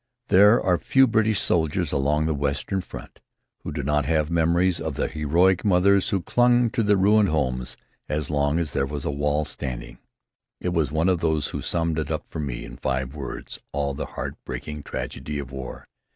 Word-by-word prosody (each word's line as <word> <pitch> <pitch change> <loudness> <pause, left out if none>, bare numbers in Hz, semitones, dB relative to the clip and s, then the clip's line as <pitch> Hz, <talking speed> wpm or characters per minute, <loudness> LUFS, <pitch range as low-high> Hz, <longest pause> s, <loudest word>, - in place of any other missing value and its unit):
There 105 +5 +7
are 90 -2 +1
few 135 0 +4
British 110 -3 +2
soldiers 80 -3 +1
along 75 +3 +1
the 80 - +1
western 70 +6 -1
front - - -11 0.4
who - - -6
do 75 -1 -4
not 75 0 +1
have 80 0 +1
memories 85 +2 +2
of 80 -3 -3
the - - 0
heroic 85 +5 +2
mothers 100 +1 +3
who 95 -5 0
clung 120 -1 +3
to 125 -2 0
their 105 -2 +3
ruined 105 +1 +4
homes 65 -5 -1 0.3
as 75 -1 -2
long 70 +1 +1
as 85 -4 -2
there 70 - 0
was 70 0 -5
a - - 0
wall 75 +1 0
standing. - - -6 0.6
It 90 - -2
was 80 -5 0
one 80 +3 +1
of 90 -3 +2
these 80 -3 0
who - - -4
summed 80 -2 -1
up - - -3
for - - -7
me, 70 -5 -4
in - - -10
five 65 0 -2
words, 75 -3 -7
all 70 -1 -1
the - - -5
heart - - -3
breaking 75 -1 -6
tragedy 75 +1 -5
of 70 -2 -6
war. 65 -2 -7
75 Hz, 195 wpm, -24 LUFS, 70-90 Hz, 0.6 s, There